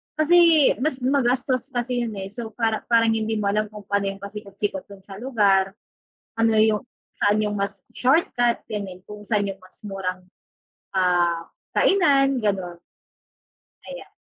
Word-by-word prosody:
Kasi, 325 -1 +5
mas 300 -4 -1
magastos 255 -1 0
kasi 245 0 -1
yun 220 - -5
eh, 190 - -5
so, 225 +1 -7
para 225 -2 -1
parang 230 -1 +5
hindi 220 0 -1
mo 200 - -1
alam 215 +1 +1
kung 210 -1 -10
pano 200 0 0
yung 195 - -11
pasikotsikot 200 -1 -5
dun 195 -1 -12
sa 195 0 -11
lugar, 200 -6 +2 0.7
ano, 225 -1 +3
yung 215 -1 +3 0.3
saan 205 +1 +2
yung 210 0 -1
mas 200 -1 -3 0.2
shortcut 250 -3 +2
ganun, 200 -4 -5
kung 210 0 -9
saan 205 -3 +1
yung 195 0 -6
mas 185 - -18
murang, 190 -2 -4 0.8
ah, 175 -2 +2 0.3
kainan 275 -8 +3
ganon. 185 -5 -2 1.1
Ayan. - - -10
215 Hz, 145 wpm, -23 LUFS, 195-245 Hz, 1.1 s, Kasi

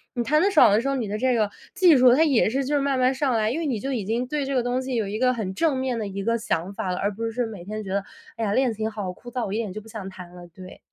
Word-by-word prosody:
你 240 - 0
弹 305 +5 +2
得 400 +3 +3
爽 380 - +7
的 215 +3 +3
时 275 - -3
候， 275 - 0
你 235 -5 -2
的 210 +1 -3
这 255 +2 +1
个 215 -2 +1 0.2
技 355 -5 +6
术 250 -1 +6
它 310 +5 +4
也 265 -8 +3
是 270 +3 -1
就 290 +3 0
是 285 - +2
慢 275 -2 0
慢 255 +1 +3
上 265 -1 0
来， 220 0 +1
因 305 - -2
为 330 - -2
你 255 -7 -1
就 270 +6 -3
已 225 - -2
经 235 +4 -1
对 295 +1 -2
这 275 - -3
个 250 - +3
东 245 +1 -1
西 260 -1 -4
有 215 -3 0
一 210 +2 -3
个 255 0 +3
很 205 -5 -4
正 295 +5 +1
面 260 -2 -1
的 210 - -3
一 200 0 -5
个 230 +2 +1
想 200 -4 -2
法 185 - -3
了， 180 - -2
而 200 - 0
不 225 +3 -4
是 245 +1 -1
每 210 -6 -8
天 215 +3 -5
觉 195 - -8
得， 200 - 0 0.3
哎 225 - -2
呀， 200 - 0
练 255 -1 +2
琴 220 +1 -2
好 205 -4 -4
枯 240 +6 -12
燥， 250 -2 -2
我 195 - -4
一 215 - -1
点 215 -5 -3
就 215 - -5
不 225 - -17
想 210 -3 -7
弹 180 -1 -11
了， 175 0 -11
对。 185 +1 -12
230 Hz, 375 characters per minute, -24 LUFS, 205-260 Hz, 0.3 s, 爽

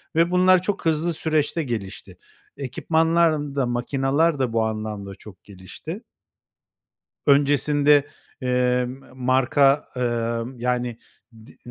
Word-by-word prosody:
ve 170 +2 +3
bunlar 185 0 +4
çok 195 0 -3
hızlı 165 +1 +1
süreçte 155 +1 0
gelişti. 110 -8 -6 0.4
Ekipmanların 160 +1 +1
da 135 -2 +1
makinalar 135 +5 0
da 125 -3 -1
bu 115 -1 +2
anlamda 110 -3 -5
çok 100 -2 -15
gelişti. 105 - -9 1.2
Öncesinde, 145 0 +4 0.3
eee, 125 0 +1
m 130 +2 -10
marka, 130 +2 +2
ımm, 120 0 -2
yani, 125 -1 -2 0.5
di - - -18
135 Hz, 110 wpm, -23 LUFS, 120-155 Hz, 1.2 s, bunlar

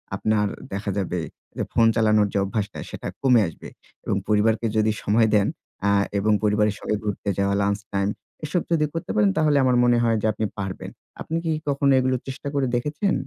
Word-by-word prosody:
আপনার 105 -1 +1 0.3
দেখা 100 +1 -2
যাবে 90 -2 -1 0.4
যে - - 0
ফোন 115 - +5
চালানোর 110 -2 +3
যে - - +1
অভ্যাসটা 105 +1 -3
সেটা - - -6
কমে 125 -4 +5
আসবে। 80 - -9 0.4
এবং - - 0
পরিবারকে 110 +2 +2
যদি 110 0 +3
সময় 110 +2 +3
দেন 100 -1 +3 0.4
আ - - +4 0.3
এবং 105 +2 +1
পরিবারের 105 0 +2
সঙ্গে 110 - -1
ঘুরতে 105 -1 -3
যাওয়া, 100 0 +1
লাঞ্চ 100 +1 0
টাইম 100 0 +1 0.4
এসব 170 +3 0
যদি 155 -2 +3
করতে 165 - -4
পারেন 105 -2 +4
তাহলে 150 -2 +3
আমার 130 -1 +3
মনে 120 -1 +4
হয় 115 -1 +2
যে - - -2
আপনি 110 +1 -2
পারবেন। 95 -1 -5 0.3
আপনি 160 - -4
কি 165 - +1 0.2
কখনো 140 0 +2
এগুলো 130 0 +1
চেষ্টা 135 +2 -6
করে 140 -2 +1
দেখেছেন? 150 +10 0
110 Hz, 190 wpm, -23 LUFS, 105-130 Hz, 0.4 s, ফোন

